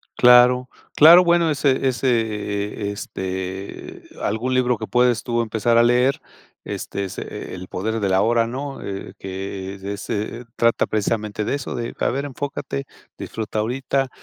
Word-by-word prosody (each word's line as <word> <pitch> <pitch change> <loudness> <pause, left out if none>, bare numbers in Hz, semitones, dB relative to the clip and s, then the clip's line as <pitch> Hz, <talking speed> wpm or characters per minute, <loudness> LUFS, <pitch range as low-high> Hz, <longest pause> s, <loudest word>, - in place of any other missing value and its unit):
Claro 125 +1 +6 0.3
claro, 170 +4 +9
bueno, 170 -1 +3
ese 135 -2 +1
ese, 125 -1 +2
eh, 105 -1 -3
este, 95 -1 -6
eh, - - -17 0.2
algún 125 +4 -1
libro 125 -1 +2
que 110 - -5
puedes 125 -2 +2
tú 120 -1 0
empezar 115 +1 +1
a 120 - +6
leer, 125 +3 +3 0.4
este, 100 - -4
es, 95 - -8
eh, - - -6
El 90 0 -8
poder 110 +5 -2
del 100 -2 0
ahora, 115 +4 +3
¿no?, 135 +3 -5
eh, 95 -1 -6
que 95 0 -6
es 95 - -15
de 100 +1 -4
ese 105 +3 -4
eh, 125 - -14
trata 115 0 +2
precisamente 105 0 -1
de - - 0
eso, 140 - -5
de 120 -1 -4
a - - +2
ver 140 +3 -2
enfócate, 140 0 -4 0.3
disfruta 110 -1 -4
ahorita 130 +3 -1
115 Hz, 170 wpm, -22 LUFS, 100-130 Hz, 0.4 s, claro